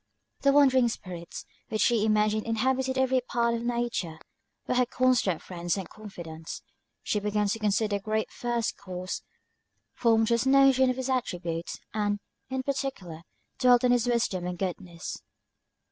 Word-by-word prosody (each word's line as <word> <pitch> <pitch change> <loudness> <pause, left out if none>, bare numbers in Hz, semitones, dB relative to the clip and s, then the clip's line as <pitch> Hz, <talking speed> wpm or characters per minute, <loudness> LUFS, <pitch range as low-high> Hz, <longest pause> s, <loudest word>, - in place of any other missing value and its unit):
The 280 - +5
wandering 265 -3 +5
spirits, 175 -6 -7 0.2
which 215 - +1
she 225 -3 +3
imagined 215 0 +2
inhabited 260 +3 0
every 260 -1 +3
part 235 -1 +1
of 230 - -2
nature, 235 -9 -2 0.5
were - - 0
her 250 0 +3
constant 250 -10 +2
friends 175 0 -2
and 190 - -4
confidants. 170 -7 -8 0.4
She 210 - 0
began 210 0 0
to 225 - -1
consider 210 0 +1
the - - -10
Great 215 +2 -1
First 240 -2 -2
Cause, 185 -1 -5 0.7
formed 225 -2 +3
just 235 +3 +1
notions 265 -1 +5
of 255 - 0
his 260 -1 -2
attributes, 175 -10 -2 0.2
and, 205 -1 0 0.3
in 260 0 -2
particular, 260 - -3 0.4
dwelt 250 -2 +5
on 250 - +4
his 245 -1 +2
wisdom 215 -7 0
and 180 0 -4
goodness. 175 -2 -5
225 Hz, 150 wpm, -28 LUFS, 190-250 Hz, 0.7 s, The